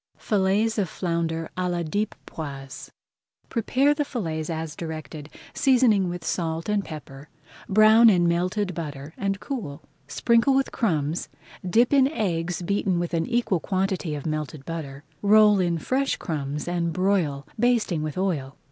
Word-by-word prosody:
FILLETS 210 +2 +1
OF 190 -5 0
FLOUNDER 165 -2 -2
À 185 0 -1
LA 175 -1 -1
DIEP 205 +7 -2
POISE 140 -4 -7 0.6
Prepare 260 +5 +2
the 295 0 0
fillets 165 - -4
as 160 -1 -4
directed, 155 -2 -7 0.2
seasoning 240 -9 +3
with 175 -1 -6
salt 165 -2 -2
and 210 -1 +1
pepper, 145 -3 -10 0.4
brown 215 +3 +7
in 175 -4 +3
melted 185 +3 0
butter, 150 -2 -6
and 195 0 -2
cool. 205 - -5 0.2
Sprinkle 235 - +3
with 270 0 +1
crumbs, 160 - -1 0.3
dip 230 +9 +3
in 270 -2 +5
eggs 180 - -2
beaten 195 0 0
with 175 0 -2
an 165 -1 0
equal 235 -7 +1
quantity 185 -4 -1
of 145 - -7
melted 155 -2 -4
butter, 145 -4 -6 0.2
roll 210 0 +6
in 175 -2 +1
fresh 265 - 0
crumbs 150 -3 -4
and 170 -1 -1
broil, 185 -7 0
basting 230 -9 +2
with 155 +2 -4
oil. 155 -8 -2
175 Hz, 145 wpm, -25 LUFS, 160-210 Hz, 0.6 s, brown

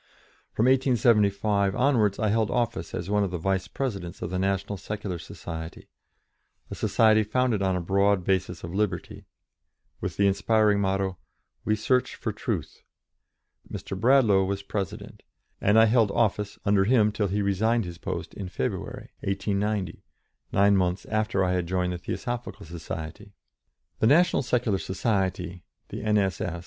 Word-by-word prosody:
From 115 - +1
1875 105 -6 +3
onwards 115 -7 +2
I 110 - 0
held 110 0 +1
office 120 -2 -2
as 85 - -4
one 105 0 +3
of 100 - -1
the 90 - -3
vice 95 +2 -1
presidents 100 -9 -4
of 90 - -4
the 95 - -1
National 95 +1 -1
Secular 100 -2 -5
Society 80 0 -8 0.8
a - - -3
society 110 -1 +3
founded 110 0 0
on 95 -1 +1
a 90 - -1
broad 100 +1 +2
basis 90 -2 -1
of 85 +1 -6
liberty, 95 -4 -2 0.7
with - - -4
the 100 - +3
inspiring 105 +1 +3
motto, 95 -1 -1 0.5
"We 110 - +2
Search 125 +4 0
for - - -3
Truth." - - -4 0.9
Mr. - - -5
Bradlaugh 115 -3 +4
was 100 +1 -2
president, 100 -2 -5 0.4
and 105 +2 +4
I 110 - +8
held 115 -1 +3
office 105 -2 0
under 100 -1 +3
him 110 -2 +4
till 105 -1 -1
he 100 +2 -1
resigned 110 +3 +1
his 85 -1 -8
post - - -5
in 95 -3 -6
February, 65 - -4
1890, 100 -1 -2 0.5
nine 100 +1 +4
months 90 0 0
after 110 -2 +1
I 90 0 +1
had 90 -2 -1
joined 90 0 0
the 90 - -5
Theosophical 120 0 -5
Society. 80 -1 -7 0.7
The 110 - +4 1.9
N.S.S. 95 -5 0
100 Hz, 140 wpm, -26 LUFS, 95-110 Hz, 1.9 s, I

